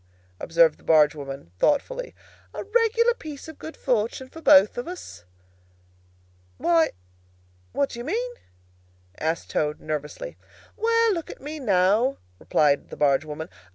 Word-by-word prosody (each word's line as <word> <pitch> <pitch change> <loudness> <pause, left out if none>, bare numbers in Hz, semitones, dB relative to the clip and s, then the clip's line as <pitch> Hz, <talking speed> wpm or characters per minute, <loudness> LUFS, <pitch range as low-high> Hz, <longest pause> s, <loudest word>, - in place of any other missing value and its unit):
observed 165 0 +3
the - - -22
barge 150 -2 +5
woman, 135 - -8
thoughtfully. - - 0 0.4
"A - - -4
regular 460 +2 +3
piece 305 - -9
of 315 - -11
good 320 - -8
fortune 245 +1 -1
for 325 - -11
both 195 -8 +6
of 245 - -5
us!" 350 - -9 1.3
"Why, 165 - +3 0.8
what 280 - 0
do 235 - -7
you 240 - -6
mean?" 470 - -2 0.9
asked 160 +1 -2
Toad, 150 0 -1
nervously. 155 - -5 0.4
"Well, 460 0 +3
look 335 -3 -4
at - - -9
me, 300 +3 -7
now," 215 +3 +2 0.2
replied 145 -2 +2
the - - -9
barge 145 0 +3
woman. 155 +1 -6
240 Hz, 140 wpm, -25 LUFS, -, 1.3 s, both